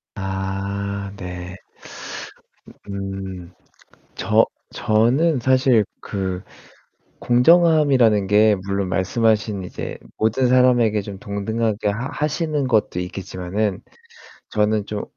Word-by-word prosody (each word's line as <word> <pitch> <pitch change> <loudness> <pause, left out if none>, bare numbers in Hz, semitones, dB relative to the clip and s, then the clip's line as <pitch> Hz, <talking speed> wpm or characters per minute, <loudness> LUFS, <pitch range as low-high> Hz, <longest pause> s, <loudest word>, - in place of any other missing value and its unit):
아 100 +1 -3
네. 90 0 -7 1.3
음. 95 -2 -6 0.6
저 - - +3 0.3
저는 125 +8 +2
사실 130 -3 +3 0.2
그 95 -1 -4 0.8
공정함이라는 130 - +4
게 105 +1 +5
물론 100 -1 -1
말씀하신 105 +1 +1
이제 90 - -6 0.2
모든 120 +4 +2
사람에게 120 -4 +4
좀 100 -1 -8
동등하게 105 +1 -2 0.2
하시는 150 -2 -1
것도 110 -6 +1
있겠지만은 95 +2 -3 0.7
저는 105 -1 +1
좀 105 -1 -4
105 Hz, 190 characters per minute, -21 LUFS, 95-120 Hz, 1.3 s, 게